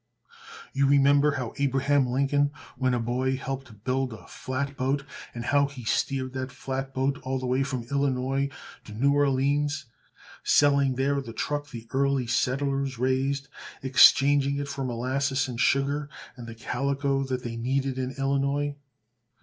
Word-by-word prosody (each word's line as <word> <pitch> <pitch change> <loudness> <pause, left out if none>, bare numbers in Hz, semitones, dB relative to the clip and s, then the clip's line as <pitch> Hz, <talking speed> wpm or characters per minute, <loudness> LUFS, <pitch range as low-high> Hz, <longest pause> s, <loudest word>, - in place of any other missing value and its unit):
You 140 0 +2
remember 140 +1 +4
how 125 -5 -4
Abraham 140 0 +2
Lincoln 140 +3 +2 0.3
when 130 -1 +1
a - - 0
boy 125 +3 0
helped 130 -6 -6
build 130 -1 -1
a 95 -7 -12
flat 140 +2 -4
boat, 135 +2 -1 0.3
and 120 0 -5
how 140 +1 +3
he 140 -3 -10
steered 130 +3 -1
that 130 0 -4
flat 135 0 -4
boat 135 +1 -1
all 130 0 -2
the 130 - -4
way 130 +2 +1
from 135 -3 -2
Illinois 135 +1 0 0.4
to 105 - -10
New 140 +5 +3
Orleans, 145 +1 +1 0.6
selling 140 -2 +4
there 140 +2 +1
the 115 -4 -9
truck 145 +4 -3
the 115 -4 -9
early 140 -1 +1
settlers 135 +2 0
raised, 135 +2 0 0.4
exchanging 140 +1 +5
it 140 0 -3
for 140 -1 -4
molasses, 130 +3 -1
and 120 -2 -6
sugar, 140 +2 +1 0.3
and 120 -2 -9
the 115 - -8
calico 140 +3 -1
that 130 -2 -3
they 115 -1 -4
needed 130 +2 -1
in 130 0 -3
Illinois. 140 +1 0
135 Hz, 155 wpm, -27 LUFS, 130-140 Hz, 0.6 s, exchanging